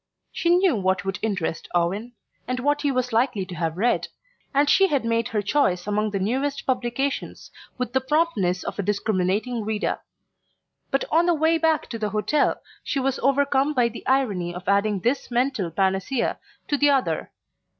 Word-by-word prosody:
She 340 - -1
knew 355 -3 +4
what 190 -2 0
would 195 +1 -2
interest 195 -7 -2
Owen, 195 +8 0 0.3
and 255 0 -2
what 290 +3 +1
he 285 - +1
was 250 -2 -1
likely 225 -4 +1
to 185 - -9
have 165 -1 -2
read, 235 +5 +1 0.4
and 285 +1 +3
she 390 +6 +5
had 280 -8 0
made 230 0 +1
her 210 -2 -2
choice 195 -7 +1
among 210 +1 0
the 200 - -2
newest 265 +8 -1
publications 255 +2 -2 0.3
with 250 -2 -3
the 265 - +2
promptness 260 - +1
of - - -5
a - - +3
discriminating 205 +3 0
reader. 215 0 -1 0.9
But 275 - 0
on 335 +3 +4
the 345 - +4
way 320 +1 +2
back 320 -1 +2
to 230 - -5
the 210 -1 -1
hotel 215 +8 0 0.2
she 280 - -1
was 270 0 0
overcome 280 +1 +2
by 245 -2 +3
the 230 - -10
irony 205 -10 +1
of 180 0 -8
adding 200 0 +2
this 250 +7 0
mental 245 -6 0
panacea 190 - 0 0.3
to 290 - +1
the 290 - +5
other. 275 -2 +1
240 Hz, 180 wpm, -24 LUFS, 200-275 Hz, 0.9 s, she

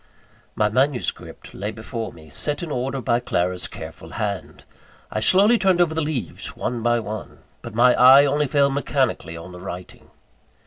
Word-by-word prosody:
VIII. - - -32
My 105 -1 +2
manuscript 130 +3 -1
lay 100 +2 -4
before 110 +1 -6
me, 80 -1 -15
set 145 - -3
in 165 - -5
order 135 +1 -2
by 120 0 +1
Clara's 90 -6 -1
careful 80 0 -10
hand. 100 -5 -4 0.5
I - - -1
slowly 200 - +5
turned 190 -3 +3
over 170 -3 +3
the 160 - -1
leaves 145 - -4
one 120 -1 -3
by 120 +1 +2
one; 110 -2 -7 0.2
but - - -9
my 125 +2 +6
eye 135 +3 +8
only 145 +1 +1
fell 140 0 +3
mechanically 130 - -1
on 85 +2 -10
the 90 0 -10
writing. 90 -1 -9
120 Hz, 175 wpm, -22 LUFS, 100-145 Hz, 0.5 s, eye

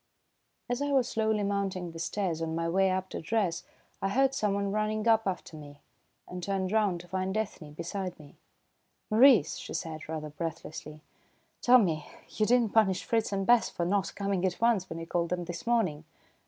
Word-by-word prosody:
As 245 +2 -2
I 285 - 0
was 265 -3 +3
slowly 220 -1 0
mounting 195 -3 -2
the 165 - -9
stairs 170 -1 -2
on 160 0 -2
my 165 0 -1
way 190 +3 +3
up 185 0 -1
to - - -5
dress, 185 -1 0 0.4
I 195 - 0
heard 270 +5 +3
someone 200 -5 0
running 215 +1 -1
up 225 -2 +4
after 180 -3 -4
me, 145 -1 -11 0.5
and 180 0 -7
turned 190 0 -1
round 205 -5 +1
to 175 - -15
find 190 +2 -2
Ethne 185 -8 -4
beside 180 +3 -4
me. 145 -2 -14 0.8
"Maurice," 220 - +6
she - - -7
said, 155 -1 -5
rather 155 -2 -4
breathlessly, 155 -1 -6 0.6
"tell 250 +1 +7
me, 160 -9 0 0.2
you 215 - 0
did 245 0 +5
not 220 - -4
punish 200 -5 +3
Fritz 225 -2 0
and 195 -1 -1
Bess 240 +2 +4
for 170 - -3
not 195 +1 0
coming 200 -2 -1
at 185 -2 0
once 225 -5 +2
when 165 - -5
you 165 - -5
called 170 0 -1
them 175 -1 -2
this 175 +5 -7
morning?" 185 -11 +1
190 Hz, 195 wpm, -29 LUFS, 165-215 Hz, 0.8 s, tell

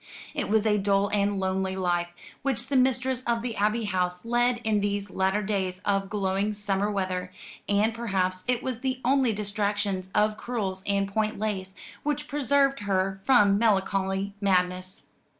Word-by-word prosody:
It - - -2
was 220 0 +3
a 210 -1 +3
dull 200 0 +2
and 200 -1 +1
lonely 190 0 -1
life 175 -2 0 0.3
which 265 -2 -2
the 280 - 0
mistress 255 0 +2
of 235 -1 0
the 240 -2 -3
Abbey 215 +3 +1
House 180 -2 -1
led 240 +1 +2
in 215 -2 +1
these 200 -1 -2
latter 190 +2 +1
days 190 -3 -1
of 195 -1 +1
glowing 200 0 0
summer 200 0 0
weather; 185 -2 -2 0.4
and 205 +2 +2
perhaps 190 -5 -1
it 250 0 +1
was 255 -3 -3 0.3
only 265 -1 +3
the 215 - -2
distractions 205 -2 -1
of 210 0 +2
crewels 200 -6 -3
and 200 -1 +1
point 215 +2 -1
lace 195 -3 -3 0.3
which 295 0 -2
preserved 275 -1 +2
her 195 -1 -1
from 205 -6 +5
melancholy 195 -2 +1
madness. 185 -1 0
205 Hz, 160 wpm, -27 LUFS, 190-230 Hz, 0.4 s, from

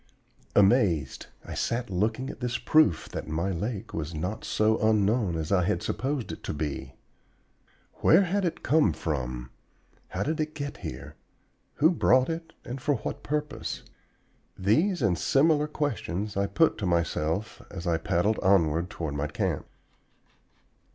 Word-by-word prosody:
Amazed, 95 - +3 0.2
I - - -7
sat 120 -1 -2
looking 110 +8 0
at - - -13
this 120 -2 -1
proof 130 - +3
that - - -5
my 85 +5 -1
lake 100 +4 -4
was 80 +1 -4
not 90 +8 -3
so 110 +1 +2
unknown 105 -3 +2
as 80 +1 -3
I 95 -2 +4
had - - 0
supposed 135 -2 -2
it - - -8
to - - -3
be. 70 -3 -4 1.0
Where 175 +5 +5
had 195 +2 0
it 175 - -2
come 150 - +3
from? 65 -6 -3 0.6
How - - -2
did 155 +2 -2
it 155 0 -2
get 145 -2 -5
here? 75 -3 -8 0.6
Who 160 +4 +4
brought 130 -5 +3
it, 165 0 -5
and 125 +2 -6
for 145 +1 +2
what - - -5
purpose? 150 0 -3 0.7
These 160 - +2
and 90 -5 +2
similar 150 +1 +3
questions 110 - -2
I 100 0 +1
put 160 -3 +2
to 100 - -1
myself 85 +3 -1
as 85 - -7
I 85 -2 +2
paddled 95 +6 +1
onward 85 -3 +3
toward 80 -4 -4
my 70 +1 -1
camp. 75 - -2
105 Hz, 150 wpm, -27 LUFS, -, 1.0 s, Where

